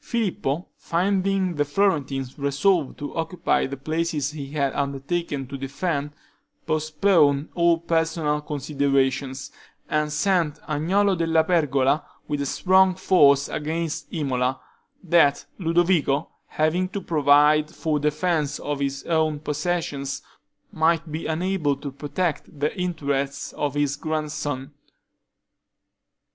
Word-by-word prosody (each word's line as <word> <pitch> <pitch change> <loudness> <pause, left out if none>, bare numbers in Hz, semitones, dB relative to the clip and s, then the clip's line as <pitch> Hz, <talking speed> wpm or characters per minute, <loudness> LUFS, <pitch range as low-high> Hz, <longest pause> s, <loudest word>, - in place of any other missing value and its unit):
Filippo, 185 - -1
finding 190 +1 0
the 145 -2 +1
Florentines 145 -5 0
resolved 140 +3 +1
to 145 - -6
occupy 165 -1 0
the 140 +1 -6
places 155 0 -1
he 145 -3 -7
had 140 -2 -1
undertaken 140 +1 -2
to 135 +1 -7
defend, 140 +2 -2 0.6
postponed 155 -1 +2
all 170 -1 +3
personal 160 -2 0
considerations, 140 -2 -1 0.4
and 150 0 0
sent 170 -2 +1
Agnolo 185 +7 +2
della 165 -1 +2
Pergola 145 -5 +2 0.2
with 145 -1 -2
a 140 - -1
strong 190 +4 +4
force 145 -7 +4
against 160 0 -3
Imola, 130 -4 -1 0.4
that 165 -5 +3
Ludovico, 165 -4 +2 0.2
having 170 +4 0
to 200 - -4
provide 150 -1 +4
for 155 -2 -1
the 150 +1 +2
defense 155 -2 -1
of 145 -1 -3
his 140 -1 -2
own 155 -2 +1
possessions, 150 -2 -2 0.5
might 165 0 +1
be 155 +2 -4
unable 160 -2 0
to 140 0 -7
protect 145 +2 -3
the 150 +1 0
interests 140 -7 -2
of 145 -1 -2
his 145 -1 0
grandson. 150 -3 -3
150 Hz, 115 wpm, -24 LUFS, 140-170 Hz, 0.6 s, strong